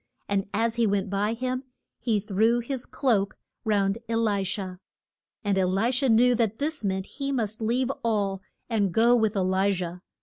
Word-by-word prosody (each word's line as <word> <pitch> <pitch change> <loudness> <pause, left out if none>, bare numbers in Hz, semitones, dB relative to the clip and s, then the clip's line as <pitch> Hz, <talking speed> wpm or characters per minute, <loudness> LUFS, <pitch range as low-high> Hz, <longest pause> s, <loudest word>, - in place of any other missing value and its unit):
And 200 -1 -1
as 230 +2 0
he 230 -2 +3
went 200 -1 0
by 205 +2 +1
him 255 +2 -2 0.4
he 225 -3 +1
threw 215 +3 +2
his 245 +1 -4
cloak 210 -8 +1 0.3
round 205 -1 +1
E 230 - 0
li 210 -3 +1
sha. 185 -1 -3 0.7
And 200 -2 +1
E - - +3
li 195 +6 +1
sha 265 +2 +1
knew 245 +2 +5
that 225 -2 0
this 300 -2 -2
meant 190 -1 -1
he 275 +4 -4
must 220 -4 -2
leave 245 +4 +1
all 200 -4 0 0.3
and 210 -5 +1
go 235 +6 +5
with 220 -2 +2
E - - +1
li 190 +2 +2
jah. 180 -1 -4
220 Hz, 190 wpm, -26 LUFS, 195-235 Hz, 0.7 s, knew